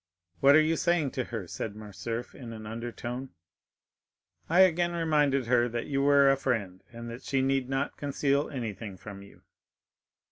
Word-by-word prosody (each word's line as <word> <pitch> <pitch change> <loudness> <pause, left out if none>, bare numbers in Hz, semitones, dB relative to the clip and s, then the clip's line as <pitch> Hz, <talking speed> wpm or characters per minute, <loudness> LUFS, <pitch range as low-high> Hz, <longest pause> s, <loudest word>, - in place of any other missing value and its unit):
"What 140 +1 +6
are 155 - +7
you 160 +1 +1
saying 170 -6 +1
to 130 - -3
her?" 115 -5 -5
said 100 +4 -5
Morcerf 110 +3 -6
in 120 -4 -9
an 110 -1 -9
undertone. 120 +3 -5 1.2
"I 175 +3 +5
again 175 -1 +3
reminded 150 -5 +2
her 120 0 +3
that 120 0 -3
you 135 -1 -1
were 140 -1 +5
a 135 - +2
friend, 105 -9 -2
and 115 0 -8
that 120 - -8
she 135 -1 0
need 135 -1 0
not 135 +1 -2
conceal 140 0 0
anything 110 -6 -5
from 100 +1 -10
you." 100 - -16
130 Hz, 170 wpm, -29 LUFS, 115-140 Hz, 1.2 s, are